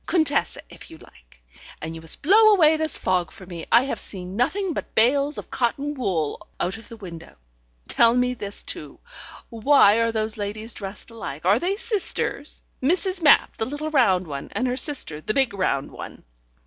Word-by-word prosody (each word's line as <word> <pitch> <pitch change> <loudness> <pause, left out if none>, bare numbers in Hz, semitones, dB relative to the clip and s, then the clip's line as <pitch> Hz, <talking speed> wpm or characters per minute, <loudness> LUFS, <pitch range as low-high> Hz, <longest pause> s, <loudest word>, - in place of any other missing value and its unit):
Contessa, 315 -5 +1
if - - -14
you 160 - -12
like. - - -20 0.4
And 160 +1 -6
you 165 - -9
must 160 - -3
blow 430 +6 +6
away 320 -4 +5
this 315 0 +2
fog 180 -3 0
for 190 - -13
me. 175 -2 -8
I 235 - +6
have 275 - -3
seen 185 -1 -7
nothing 360 - 0
but - - -6
bales 280 +6 +3
of - - -8
cotton 275 +4 -1
wool 185 - -2
out 185 - -1
of 225 -1 -11
the 230 - -10
window. 170 -6 -10 0.5
Tell 235 0 +4
me 250 0 +1
this, 205 -4 -3
too: - - -6 0.5
why 230 -2 +4
are 230 0 +1
those 220 -1 -2
ladies 215 +2 -5
dressed 200 +3 -8
alike? 170 -9 -7
Are 200 +5 +4
they 370 +6 -1
sisters? 400 - -2 0.2
Mrs. 365 +6 +1
Mapp, 295 -3 +4
the 220 - -1
little 290 +4 -5
round 190 -11 +3
one, 140 -3 -7
and 255 - -1
her 250 - -1
sister, 255 - +1
the 215 - -3
big 265 -5 +2
round 185 -8 -1
one?" - - -10
230 Hz, 185 wpm, -23 LUFS, 185-290 Hz, 0.5 s, blow